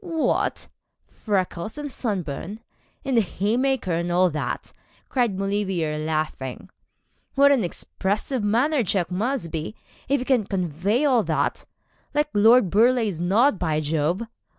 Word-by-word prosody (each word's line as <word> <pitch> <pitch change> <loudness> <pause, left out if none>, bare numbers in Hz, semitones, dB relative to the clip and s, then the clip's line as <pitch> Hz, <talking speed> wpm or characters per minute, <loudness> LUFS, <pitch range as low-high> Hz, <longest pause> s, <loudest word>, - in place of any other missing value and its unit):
'What! 330 -4 -1 0.4
freckles 195 +1 -3
and 295 -1 -5
sunburn, 200 - -4 0.4
and 265 -3 +1
the - - +6
haymaker, 220 +4 0
and 170 +1 -1
all 180 0 +3
that?' 150 - -4 0.4
cried 240 -7 +1
Maulevrier, 190 -6 -1
laughing. 155 0 -3 0.6
'What 280 +1 +6
an 265 -6 +3
expressive 205 +7 -2
manner 250 +8 +2
Jack's 185 -4 -1
must 215 -1 -2
be, 160 +6 -4 0.3
if 280 0 +3
it 250 - -4
can 245 -7 +2
convey 190 - 0
all 255 -5 +4
that - - -1 0.5
like 295 0 +2
Lord 220 -1 +5
Burleigh's 225 -4 +3
nod, 205 +5 +3
by 160 -3 0
Jove. 155 +6 0
205 Hz, 130 wpm, -24 LUFS, 175-250 Hz, 0.6 s, the